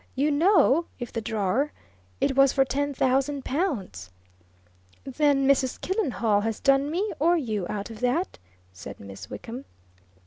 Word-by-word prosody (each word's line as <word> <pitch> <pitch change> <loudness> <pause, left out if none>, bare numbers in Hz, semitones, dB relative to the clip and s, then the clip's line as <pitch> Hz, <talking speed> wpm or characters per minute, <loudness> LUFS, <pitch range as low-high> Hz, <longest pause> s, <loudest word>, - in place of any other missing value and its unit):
"You 285 +3 +1
know 335 0 +4
if 245 -2 -7
the 230 - -2
drawer! 220 +7 -1 0.5
It 270 - +1
was 275 0 +5
for 270 -1 +3
ten 285 +3 -1
thousand 270 +1 0
pounds!" 215 - -2 0.9
"Then 275 0 +1
Mrs. 265 -2 +2
Killenhall 240 - 0
has 225 0 -2
done 275 +1 +3
me, 385 +6 -1
or 340 +4 +3
you, 215 - -2
out 205 +1 -4
of 220 - -10
that," 250 +10 -1 0.3
said 95 +2 -10
Miss 95 -2 -10
Wickham. 245 +4 -7
270 Hz, 145 wpm, -26 LUFS, 225-290 Hz, 0.9 s, was